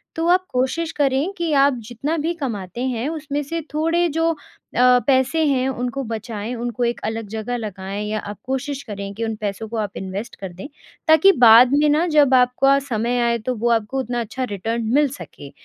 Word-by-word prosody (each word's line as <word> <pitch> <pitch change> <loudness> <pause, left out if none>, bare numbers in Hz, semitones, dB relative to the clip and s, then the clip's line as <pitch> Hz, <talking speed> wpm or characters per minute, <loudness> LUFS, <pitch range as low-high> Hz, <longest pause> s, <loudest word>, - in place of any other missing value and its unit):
तो 325 -1 -1
आप 365 +1 +3
कोशिश 265 +6 -1
करें 280 +4 0
कि 340 -2 -1
आप 280 0 +5 0.2
जितना 275 +7 -2
भी 335 +2 0
कमाते 230 - -5
हैं 245 0 -2
उसमें 295 -2 -3
से 330 +4 -4
थोड़े 330 +3 +1
जो 325 +2 +1
अ, - - -4 0.7
पैसे 270 +4 +3
हैं 265 -3 +1
उनको 250 +1 -3
बचाएँ 225 -1 -5
उनको 240 0 -3
एक 235 0 -1
अलग 225 0 -3
जगह 220 +3 -3
लगाएँ 200 -2 -5
या 215 0 -1
आप 205 -1 -7
कोशिश 270 +2 -3
करें 200 -1 -6
कि 225 +3 -5
उन 225 -1 -2
पैसों 205 +1 -3
को 230 - -4
आप 205 -2 -3
इन्वेस्ट 195 +4 -6
कर 190 -2 -7
दें। 185 +7 -8 0.4
ताकि 315 +5 +7
बाद 240 - +7
में 295 +1 +4
ना 305 +4 +3
जब 295 -5 +4
आपका 255 +2 +4
समय 245 -2 -1
आए 235 0 +2
तो 255 - -1
वो 235 +2 0
आपको 230 +3 0
उतना 245 -2 -2
अच्छा 245 +3 -4
रिटर्न 225 +4 -3
मिल 295 +1 +4
सके, 145 - -10
250 Hz, 200 wpm, -21 LUFS, 220-285 Hz, 0.7 s, ताकि